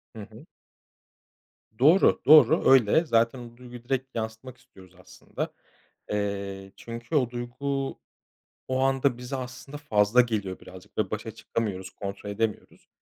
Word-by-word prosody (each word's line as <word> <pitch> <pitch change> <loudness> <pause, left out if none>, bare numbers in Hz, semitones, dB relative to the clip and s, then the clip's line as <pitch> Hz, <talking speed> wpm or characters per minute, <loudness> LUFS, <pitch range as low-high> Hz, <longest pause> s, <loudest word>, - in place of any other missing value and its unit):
Hı 110 - -7
hı. 110 +1 -13 1.3
Doğru, 160 +9 +5
doğru, 155 +2 +7
öyle. 135 +5 +5
Zaten 115 -2 +2
o 120 -1 -11
duyguyu 125 -1 -11
direkt 130 +1 -3
yansıtmak 110 +3 -6
istiyoruz 95 -1 -19
aslında. - - -7 0.6
Eee, 100 -1 -3
çünkü 115 +5 -8
o 125 -5 +2
duygu 135 +3 -4 0.7
o 130 0 -1
anda 135 -1 +1
bize 125 +2 -6
aslında 130 +3 -7
fazla 110 -4 +3
geliyor 105 -6 -3
birazcık 90 0 -14
ve - - -1
başa - - -4
çıkamıyoruz, 95 -5 -4
kontrol 100 +1 -7
edemiyoruz 110 +1 -4
120 Hz, 130 wpm, -26 LUFS, 105-130 Hz, 1.3 s, doğru